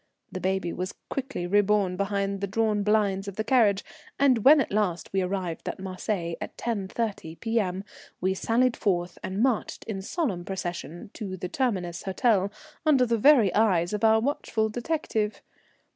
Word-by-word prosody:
The 185 - -4
baby 190 -2 -1
was 185 +2 -4 0.2
quickly 270 -9 -3
reborn 205 0 +2
behind 200 0 -1
the 200 - -1
drawn 215 +1 +1
blinds 200 -2 +1
of 200 - -6
the 220 - -1
carriage, 215 -5 +3 0.3
and 265 -4 +4
when 295 +2 +8
at 265 - -1
last 195 -5 -1
we 195 - +2
arrived 180 -3 -3
at - - -5
Marseilles 185 -2 -3
at - - -7
10.30 205 -6 -3
P.M. 205 -5 -1 0.4
we 190 +1 +1
sallied 235 +5 +1
forth 175 -3 -1
and 195 +4 -1
marched 255 -5 0
in 200 -4 -4
solemn 200 - -2
procession 175 -1 -5
to 190 -4 -5
the 180 0 -5
Terminus 185 -10 -1
Hotel 200 0 +1 0.3
under 285 -5 +4
the 230 -1 0
very 240 -6 +6
eyes 185 -5 +2
of 210 - -2
our 220 0 +6
watchful 220 -4 -1
detective. 230 -3 -2
200 Hz, 160 wpm, -27 LUFS, 185-225 Hz, 0.4 s, when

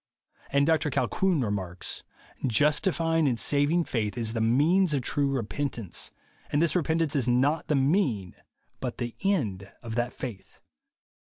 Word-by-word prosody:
And 140 0 +3
Dr 155 -1 +2
Colquhoun 180 +3 +1
remarks, 95 -5 -3 0.5
"Justifying 165 - +2
and 120 -4 0
saving 145 +4 +2
faith 110 -6 -2
is 115 -2 -1
the 115 - -1
mean 150 +12 +4
of 135 - -1
true 140 +2 +1
repentance; 120 -4 -3 0.4
and 145 - +2
this 165 -2 +2
repentance 160 -2 +1
is 130 -4 +1
not 135 +6 +2
the 150 - +2
mean 135 - +1 0.4
but 125 -2 -4
the 120 -2 -4
end 105 - -1
of 115 -1 -5
that 120 +1 -1
faith." 115 -7 -8
135 Hz, 145 wpm, -27 LUFS, 115-160 Hz, 0.5 s, mean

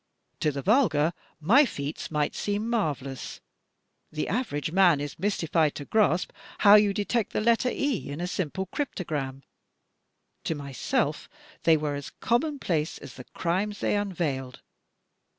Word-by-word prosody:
To 150 - +1
the 140 -1 -5
vulgar, 175 - +3 0.3
my 220 - +6
feats 145 - -4
might 150 -2 0
seem 205 +2 -2
marvelous 145 - -2 0.4
— - - -39
^the 155 - -1
average 160 - -2
man 175 -4 +5
is 145 +1 -6
mystified 165 -5 +1
to 145 - -6
grasp 205 -3 +2 0.3
how 200 - +10
you 210 -1 +7
detect 210 +2 -1
the - - +1
letter 235 +3 +3
*e' 260 - -1
in 145 +2 -5
a 175 - -1
simple 185 +1 -2
crypto 260 - -4
gram 135 -4 -4 0.5
— - - -50
to 160 - -1
myself 140 -3 -2 0.4
they 160 -1 +6
were 150 -1 -2
as 145 -1 -5
commonplace 235 - 0
as - - -11
the - - -11
crimes 195 +5 -1
they - - +1
unveiled. 160 -11 -2
175 Hz, 150 wpm, -27 LUFS, 145-210 Hz, 0.5 s, how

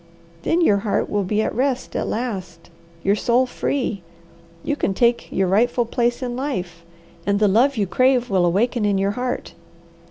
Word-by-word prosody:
Then 335 - +1
your 210 -11 +4
heart 200 +1 -1
will 205 -1 +1
be 210 +3 0
at - - -2
rest 260 +1 -1
at - - -1
last, 185 -8 -5 0.3
your 200 +1 +3
soul 240 +4 +2
free, 250 -5 -2 0.6
you 290 - -1
can 195 -9 -1
take 235 +2 +1
your 190 - +1
rightful 235 +5 +2
place 240 +2 -1
in 245 -1 -3
life, 185 - -4 0.4
and 200 +2 +1
the 210 0 +3
love 245 +7 +3
you 205 - +1
crave 255 +6 +2
will 190 -5 +2
awaken 220 +6 +1
in 205 -1 +2
your 195 +1 +1
heart. 250 +3 -4
225 Hz, 180 wpm, -21 LUFS, 195-250 Hz, 0.6 s, your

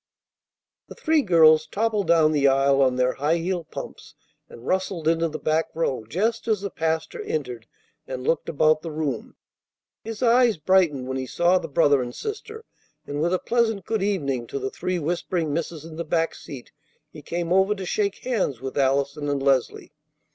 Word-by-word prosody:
The - - -11
three 315 -1 +2
girls 160 - +5
toppled 210 -3 -1
down 160 -2 +4
the 145 -2 +3
aisle 135 0 +3
on 130 -2 +3
their 125 0 +1
high 150 +5 +1
heeled 170 -1 -3
pumps, - - -9 0.3
and 120 - -13
rustled 185 -2 -1
into 165 0 +2
the 155 -1 -5
back 155 +1 0
row 135 -8 -1
just 220 - -1
as 215 -3 +1
the 200 -1 -4
pastor 160 0 -2
entered 125 -7 -4 0.4
and 130 -1 -5
looked 165 - 0
about 155 +1 +3
the 165 - -6
room. 150 -6 -4 0.7
His 225 +2 -5
eyes 240 -2 +4
brightened 155 -5 +2
when 130 0 -3
he 130 -1 -4
saw 175 +7 +2
the 165 - -6
brother 145 -2 +3
and 120 -1 -6
sister, 440 +1 -6 0.4
and 145 +1 -4
with 170 +2 +1
a 185 - +2
pleasant 225 -3 0
"Good 220 -2 -1
evening" 140 - -1
to - - -5
the 130 0 -3
three 180 +1 -2
whispering 170 -1 -2
misses 160 -1 -4
in 160 -1 -10
the 170 - -2
back 165 +1 0
seat 135 -4 -10 0.4
he - - -11
came 170 0 -2
over 190 +2 +3
to 190 -2 -6
shake 200 +2 -1
hands 200 - -1
with 135 +2 -4
Allison 140 +2 0
and 140 -1 -1
Leslie. 135 +1 0
160 Hz, 185 wpm, -24 LUFS, 140-190 Hz, 0.7 s, girls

